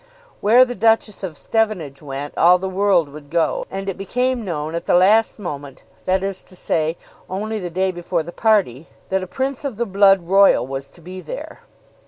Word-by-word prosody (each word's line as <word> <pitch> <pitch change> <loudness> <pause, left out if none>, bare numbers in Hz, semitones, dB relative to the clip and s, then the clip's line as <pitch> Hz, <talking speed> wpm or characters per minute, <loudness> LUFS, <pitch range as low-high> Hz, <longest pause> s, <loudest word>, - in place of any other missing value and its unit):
Where 235 +5 +6
the 245 - -5
Duchess 225 -1 +1
of 175 -6 -6
Stevenage 195 -11 -1
went 145 0 -6
all 175 +2 +6
the 190 +1 -4
world 190 -4 +2
would 145 0 -12
go. 165 +1 0
And 195 0 -5
it 195 -1 -4
became 250 +5 -1
known 155 -4 -4
at 170 - -4
the - - +3
last 210 +5 +4
moment, 145 -8 -7 0.2
that 190 +1 +1
is 195 -1 -3
to 185 - -16
say 160 -1 -1 0.3
only 215 +3 -3
the 180 -3 -5
day 185 +2 0
before 175 -1 -2
the 170 - -8
party, 185 - +1 0.2
that 190 0 0
a 185 - -6
prince 265 +7 -3
of 275 -5 -3
the 235 +3 -1
blood 195 -2 +4
royal 195 -6 +5
was 135 +1 -5
to 170 - -20
be 185 +3 -9
there. - - -8
190 Hz, 200 wpm, -20 LUFS, 165-210 Hz, 0.3 s, Where